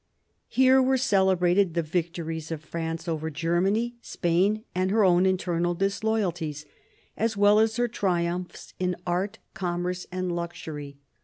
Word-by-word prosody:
Here 260 +1 +5
were 260 +1 +3
celebrated 190 -6 +3
the 170 - +1
victories 165 -1 -3
of 160 -2 -5
France 165 +1 -4
over 160 -1 -2
Germany, 185 +9 0
Spain, 190 +5 +1
and 185 +1 0
her 215 +2 +3
own 180 0 +4
internal 175 -2 0
disloyalties, 185 -6 -1 0.5
as 225 0 -1
well 205 +1 +5
as 220 0 +2
her 240 0 +1
triumphs 180 -5 -2
in 180 -1 0
art, 185 +3 -1 0.2
commerce, 180 0 -3
and 185 -1 -2
luxury. 150 -4 -6
180 Hz, 135 wpm, -26 LUFS, 170-200 Hz, 0.5 s, Here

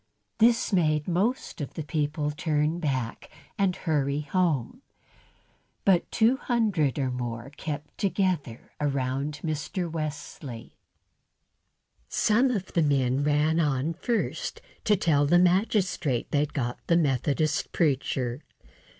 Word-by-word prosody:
This 230 0 +4
made 155 -4 +2
most 190 +2 -1
of 140 - -6
the 160 - -3
people 150 -1 -1
turn 150 +2 0
back 130 -7 -2 0.3
and 195 -2 +1
hurry 145 -3 0
home, 165 - 0 1.0
but 185 -3 +3
two 235 +3 +3
hundred 205 - +1
or 135 -3 0
more 120 +1 -4
kept 150 0 -6
together 185 - -1
round 140 +1 -1
Mr. 160 +3 -2
Wesley. 150 -6 -6 1.3
Some 235 +5 +3
of 200 -7 -3
the 170 - +3
men 135 -2 +2
ran 150 +2 +2
on 150 0 +1
first 230 +7 -2 0.3
to 210 - +5
tell 145 -5 +3
the 175 +4 +5
magistrate 180 - +1
they'd 145 0 +1
got 120 -4 -2
the 170 - +4
Methodist 145 0 +1
preacher. 135 -4 0
150 Hz, 115 wpm, -27 LUFS, 140-180 Hz, 1.3 s, to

